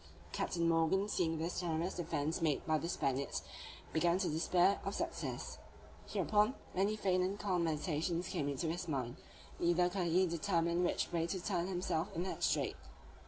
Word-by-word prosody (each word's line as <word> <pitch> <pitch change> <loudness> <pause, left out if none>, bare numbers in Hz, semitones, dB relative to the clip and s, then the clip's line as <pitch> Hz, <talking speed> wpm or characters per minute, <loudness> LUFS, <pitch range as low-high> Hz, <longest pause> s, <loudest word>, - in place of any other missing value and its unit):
Captain 170 -1 0
Morgan 165 +4 +3
seeing 165 -5 0
this 165 +3 -2
desperate 170 +1 -1
defence 160 -2 -1
made 155 -4 +1
by 155 -1 +2
the 170 - -3
Spaniards, 140 -4 -1 0.5
began 170 +2 +3
to 190 -1 0
despair 175 +5 +3
of 195 +1 -3
success. - - -3 0.5
Hereupon, 210 +5 +2 0.2
many 200 +3 +2
faint 185 -3 +2
and 190 +2 -1
calm 185 -5 0
meditations 165 +3 -1
came 150 -6 -1
into 140 +3 -2
his 175 +2 -2
mind; 130 -5 -2 0.4
neither 175 +1 +3
could 180 -2 0
he 180 +3 +4
determine 170 0 +1
which 175 - 0
way 165 -1 0
to 190 +2 -2
turn 180 -1 -1
himself 175 -3 -1
in 170 - 0
that 185 - -4
strait. - - +1
170 Hz, 165 wpm, -36 LUFS, 160-185 Hz, 0.5 s, he